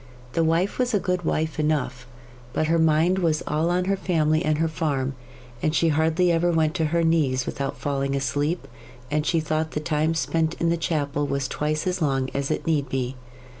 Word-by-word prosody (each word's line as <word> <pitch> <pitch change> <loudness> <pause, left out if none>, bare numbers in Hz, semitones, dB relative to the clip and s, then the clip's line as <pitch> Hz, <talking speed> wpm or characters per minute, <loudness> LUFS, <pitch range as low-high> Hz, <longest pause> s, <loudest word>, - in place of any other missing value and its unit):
The 165 - +2
wife 165 +7 +1
was 250 -2 +1
a - - +3
good 180 -2 -1
wife 155 0 -1
enough, 140 -5 -1 0.5
but 155 - +1
her 165 +1 +2
mind 160 +4 +3
was 160 -4 +1
all 155 +3 0
on 180 +1 +1
her 195 +1 +1
family 160 -4 +1
and 155 -2 +1
her 165 +1 +1
farm, 140 -4 -1 0.5
and 155 +1 0
she 165 - +3
hardly 160 +3 +2
ever 170 +1 +2
went 160 -2 +2
to 160 - +1
her 165 +2 +1
knees 145 -6 +2
without 140 0 -3
falling 140 -1 -1
asleep, 145 +5 -1 0.4
and 150 +1 0
she 165 - +2
thought 155 0 -1
the - - -1
time 155 +1 0
spent 165 0 0
in 170 - 0
the 170 - +2
chapel 145 -2 -1
was 140 -1 -1
twice 150 +3 -2
as 185 0 -1
long 135 -3 0
as 140 0 -2
it - - -2
need 145 -4 0
be. 130 0 -2
155 Hz, 205 wpm, -24 LUFS, 145-165 Hz, 0.5 s, a